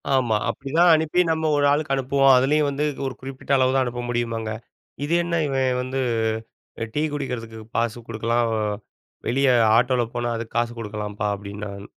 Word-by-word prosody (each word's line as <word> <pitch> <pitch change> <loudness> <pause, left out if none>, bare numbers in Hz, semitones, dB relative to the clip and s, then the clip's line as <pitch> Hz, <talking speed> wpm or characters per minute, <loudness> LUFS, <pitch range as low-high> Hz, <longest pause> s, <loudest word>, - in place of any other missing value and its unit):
ஆமா. 120 -4 +2
அப்படித்தான் 165 +6 +2
அனுப்பி 160 +3 +2
நம்ம 160 -1 0
ஒரு 145 - +3
ஆளுக்கு 145 -1 +1
அனுப்புவோம். 135 0 +4
அதுலயும் 145 +3 +3
வந்து 140 +2 -1 0.2
ஒரு 130 - -2
குறிப்பிட்ட 135 +1 -7
அளவுதான் 130 0 +3
அனுப்ப 120 0 -4
முடியுமாங்க. 115 -2 -2 0.5
இது 160 - -1
என்ன 170 0 -2
இவன் 130 -2 +1
வந்து 130 +1 -3 0.9
டீ 150 - 0
குடிக்கிறதுக்கு 115 -6 -5 0.2
காசு 115 0 0
குடுக்கலாம். 115 +1 0 0.8
வெளிய 135 +2 +2 0.3
ஆட்டோல 125 0 +2
போனா 120 0 -1
அதுக்கு 115 0 -7
காசு 120 0 +1
கொடுக்கலாம்பா 105 -1 -4
அப்படின்னான். 100 0 -7
125 Hz, 145 wpm, -23 LUFS, 115-140 Hz, 0.9 s, அனுப்புவோம்